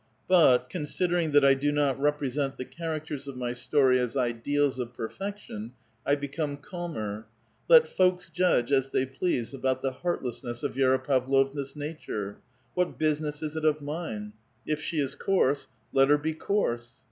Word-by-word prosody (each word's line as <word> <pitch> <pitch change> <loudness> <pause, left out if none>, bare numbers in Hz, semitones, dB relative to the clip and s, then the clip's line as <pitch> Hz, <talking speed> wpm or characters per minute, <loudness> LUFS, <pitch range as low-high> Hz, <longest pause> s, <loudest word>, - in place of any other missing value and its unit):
But, 145 -9 +5
considering 175 +3 -1
that 145 -1 +6
I 135 - +7
do 140 +2 0
not 145 -2 +1
represent 145 -1 0
the 130 - -5
characters 155 0 -5
of 140 - -6
mj 125 -1 -3
story 130 0 +3
as 125 +2 -1
ideals 130 +3 +1
of 120 -1 -4
perfection, 125 - -6 0.3
1 145 - +4
become 145 +1 -3
calmer. 145 - -5 0.4
Let 485 -1 +8
folks 180 -1 +2
judge 175 -9 +2
as 135 -1 +3
they 130 - +1
please 130 -2 -2
about 130 -1 -1
the 135 - +1
heartlessness 125 -6 -4
of - - -1
Vi6ra 130 0 +2
Pavlovna's 135 +1 +1
nature. 145 -9 -5 0.4
What 180 0 0
business 150 0 -1
is 155 0 -4
it 160 - -3
of 155 -1 +3
mine? 145 -9 -5 0.3
If 155 0 -1
she 160 - -3
is 140 -2 0
coarse, 145 -8 +1 0.3
let 135 0 +5
her 145 - +6
be 155 +2 -2
coarse. 120 - -1
140 Hz, 160 wpm, -28 LUFS, 130-155 Hz, 0.4 s, Let